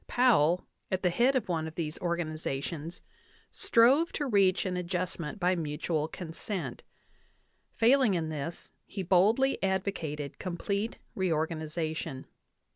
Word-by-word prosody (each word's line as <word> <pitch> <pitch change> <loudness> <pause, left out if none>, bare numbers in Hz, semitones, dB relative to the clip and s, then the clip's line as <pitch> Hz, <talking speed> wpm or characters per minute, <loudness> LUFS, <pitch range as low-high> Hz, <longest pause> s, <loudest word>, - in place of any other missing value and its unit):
Powell, 185 -9 +4 0.2
at 185 0 -1
the 180 - +3
head 245 +8 +3
of 255 - 0
one 160 -3 -1
of 160 - -9
these 160 -2 -3
organizations, 160 -2 -3 0.5
strove 265 +9 +4
to 295 - -1
reach* 200 -7 +3
an 185 -1 -1
adjust 180 0 -2
ment 170 +6 -5
by 180 0 +3
mutual 155 -1 -1
consent; 165 - -5 0.9
failing 235 -2 +4
in 160 -2 -1
this, 155 +2 -5 0.2
he 195 - -4
boldly 210 +10 +3
advocate! 180 -7 -2
complete 200 +4 -2 0.2
reorganization. 160 -4 -2
175 Hz, 120 wpm, -30 LUFS, 160-200 Hz, 0.9 s, Powell